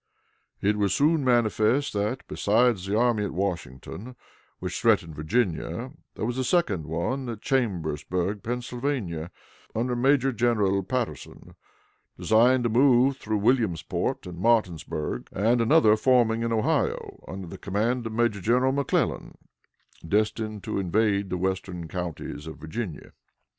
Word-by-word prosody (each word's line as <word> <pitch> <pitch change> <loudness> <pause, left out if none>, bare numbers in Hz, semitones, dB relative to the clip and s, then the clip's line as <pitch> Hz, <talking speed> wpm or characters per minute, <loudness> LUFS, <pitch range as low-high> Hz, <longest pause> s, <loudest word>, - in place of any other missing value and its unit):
It 105 +2 +2
was 100 -3 +1
soon 155 +1 +3
manifest 120 +2 +2
that, 105 +5 -2
besides 105 -2 +2
the 105 +2 0
army 120 -3 +2
at 95 -5 -4
Washington, 95 - -4 0.4
which 90 +7 -4
threatened 105 -9 +2
Virginia, 80 +4 -1 0.2
there - - -3
was 120 +2 -2
a - - +1
second 110 - +1
one 120 +11 -2
at 110 -2 -7
Chambersburg, 90 - -1
Pennsylvania, 120 - -3 0.5
under 120 +2 0
Major 135 +2 +3
General 105 -4 +2
Patterson, 125 +4 -5 0.6
designed 120 +3 +4
to 120 - +1
move 130 +2 +4
through 110 -4 -2
Williamsport 110 -6 0
and 90 -2 -8
Martinsburg, 90 -9 0
and 115 +5 +2
another 115 -3 +5
forming 115 -1 +3
in 115 0 -1
Ohio, 110 -1 -1
under 95 0 -6
the 85 - -9
command 115 +5 -1
of 110 - -6
Major 110 -3 +1
General 125 +6 +3
McClellan, 140 0 -1 0.7
destined 105 +3 -1
to - - -2
invade 100 +1 +1
the 90 - -2
western 90 -2 -3
counties 80 -3 -5
of 80 - -8
Virginia. 80 +3 -6
110 Hz, 130 wpm, -26 LUFS, 95-120 Hz, 0.7 s, another